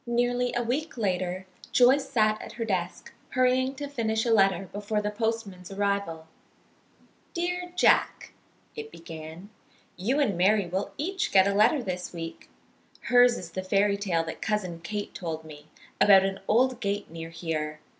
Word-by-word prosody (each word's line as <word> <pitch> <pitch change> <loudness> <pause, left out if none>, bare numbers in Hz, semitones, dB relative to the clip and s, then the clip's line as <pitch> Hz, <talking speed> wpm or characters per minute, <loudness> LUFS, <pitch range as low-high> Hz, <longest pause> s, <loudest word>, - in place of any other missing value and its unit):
Nearly 245 +1 +1
a 240 - 0
week 265 +5 -2
later 185 -3 -1 0.3
Joyce 260 +3 +4
sat 215 -2 +2
at - - -9
her 230 -1 -3
desk, 180 -4 -3 0.2
hurrying 255 +1 +2
to 285 +1 -5
finish 225 -5 -1
a 230 - +3
letter 195 -2 +3
before 205 +1 -2
the 210 0 -2
postman's 210 -4 -3
arrival. 200 -5 -1 1.1
"Dear 355 +1 -2
Jack," 365 - +2 0.4
it 445 -1 -7
began. 165 +4 -10 0.5
"You 235 +11 0
and 255 -10 +2
Mary 195 +3 +3
will 185 +3 -3
each 375 +5 -2
get 190 0 +6
a 200 - +1
letter 230 +7 +3
this 180 -3 -4
week. 165 -1 -7 0.6
Hers 245 -1 +6
is 170 -2 -8
the 185 - -3
fairy 200 +2 +2
tale 185 -5 0
that 160 - -7
Cousin 185 -6 -2
Kate 205 +4 -5
told 160 -3 -5
me, 150 -1 -12 0.3
about 195 -2 +7
an 195 0 -2
old 250 +3 +3
gate 200 -4 -2
near 165 0 -7
here. 155 -2 -4
205 Hz, 160 wpm, -27 LUFS, 180-245 Hz, 1.1 s, about